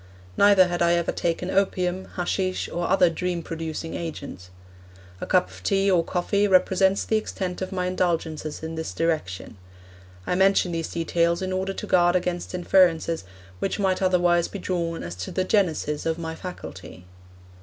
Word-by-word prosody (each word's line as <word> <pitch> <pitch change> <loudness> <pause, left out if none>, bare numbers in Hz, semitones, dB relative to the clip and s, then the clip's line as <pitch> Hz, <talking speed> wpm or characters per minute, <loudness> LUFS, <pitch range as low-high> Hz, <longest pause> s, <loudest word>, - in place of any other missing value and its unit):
Neither 200 -2 +6
had 175 -1 -3
I 170 0 +4
ever 170 -1 0
taken 175 +2 -2
opium, 185 -1 0
haschish, 185 +1 -1
or 175 0 -3
other 185 -1 +5
dream 175 0 -2
producing 165 0 -5
agent. 140 - -6 0.7
A - - -4
cup 180 -1 +2
of - - -13
tea 195 0 +2
or 175 -3 +3
coffee 200 +4 0
represents 190 +1 +3
the 220 - +2
extent 190 -4 -4
of 185 - -3
my 180 -1 -1
indulgences 165 -4 -2
in 160 0 -4
this 160 0 -5
direction. 155 - -2 0.7
I - - -1
mention 190 -1 +3
these 165 -1 -3
details 170 +1 0
in 185 0 -2
order 190 +1 -1
to - - -6
guard 175 0 +3
against 180 0 -2
inferences 170 - +2 0.3
which 195 - -1
might 190 -2 0
otherwise 175 -2 +3
be - - -7
drawn 170 -3 -2
as 85 - -5
to 90 - -5
the 185 - 0
genesis 165 -7 0
of 160 0 0
my 160 -1 -4
faculty. 100 - -9
175 Hz, 165 wpm, -25 LUFS, 165-185 Hz, 0.7 s, Neither